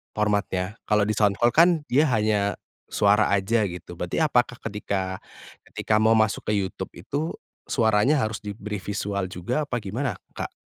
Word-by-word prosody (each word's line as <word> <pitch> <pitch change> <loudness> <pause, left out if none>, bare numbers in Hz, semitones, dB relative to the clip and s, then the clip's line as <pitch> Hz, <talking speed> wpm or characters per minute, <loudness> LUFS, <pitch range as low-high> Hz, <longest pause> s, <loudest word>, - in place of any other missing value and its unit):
formatnya. 105 -1 -1
Kalau 105 -1 +3
di 105 - 0
Soundcloud 105 +2 +2
kan, 170 +3 +7 0.2
dia 145 +5 +4
hanya, 105 -4 +1 0.3
suara 105 +1 +3
saja 105 +3 +2
gitu. 90 -2 -7
Berarti 90 - -2
apakah 125 -5 +1
ketika 100 -3 -3 0.5
ketika 105 - 0
mau 110 +1 +4
masuk 110 -2 +1
ke 105 - 0
YouTube 95 -3 -3
itu, 155 +4 -4 0.3
suaranya 110 +3 +3
harus 110 -2 -1
diberi 105 +1 -6
visual 100 0 -3
juga 95 - -2
apa 130 - -3
gimana 115 +8 -2 0.2
Kak? - - -4
105 Hz, 150 wpm, -25 LUFS, 100-115 Hz, 0.5 s, kan